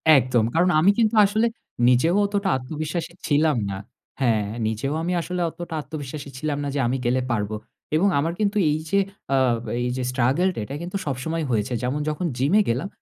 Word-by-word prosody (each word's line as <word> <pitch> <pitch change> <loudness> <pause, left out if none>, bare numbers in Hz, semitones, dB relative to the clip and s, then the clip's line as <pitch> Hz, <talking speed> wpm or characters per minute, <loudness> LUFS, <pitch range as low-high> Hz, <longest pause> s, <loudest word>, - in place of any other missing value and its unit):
একদম। 125 -3 +3
কারণ 175 +2 +4
আমি 180 +6 +6
কিন্তু 225 0 +3
আসলে 215 +3 +2 0.4
নিজেও 130 +8 +4
অতটা 200 -1 0
আত্মবিশ্বাস 155 +5 -4 0.2
ছিলাম 150 -1 +3
না। 95 - -4 0.4
হ্যাঁ 110 -5 +2 0.2
নিজেও 110 +6 -2
আমি 180 +2 -1
আসলে 180 +1 -3
অতটা 175 0 -8
আত্মবিশ্বাসী 145 -1 -7
ছিলাম 145 +1 -2
না - - -2
যে - - 0
আমি 130 +2 0
গেলে 125 +2 +2
পারব। 105 -2 -1 0.4
এবং 175 +6 +4
আমার 165 +4 0
কিন্তু 210 0 +1
এই 150 - +1
যে 200 - +3 0.4
আ - - +4 0.4
এই 120 - 0
যে 130 - -1
স্ট্রাগল 130 +8 +2
টা - - -4
এটা 135 - -6
কিন্তু 180 +3 -3
সবসময় 155 +4 -2
হয়েছে। 115 +2 0
যেমন 130 +4 -1
যখন 155 +4 -2
জিম 140 +7 +1
এ - - +6
গেলাম 125 +10 0
150 Hz, 190 wpm, -24 LUFS, 125-175 Hz, 0.4 s, আমি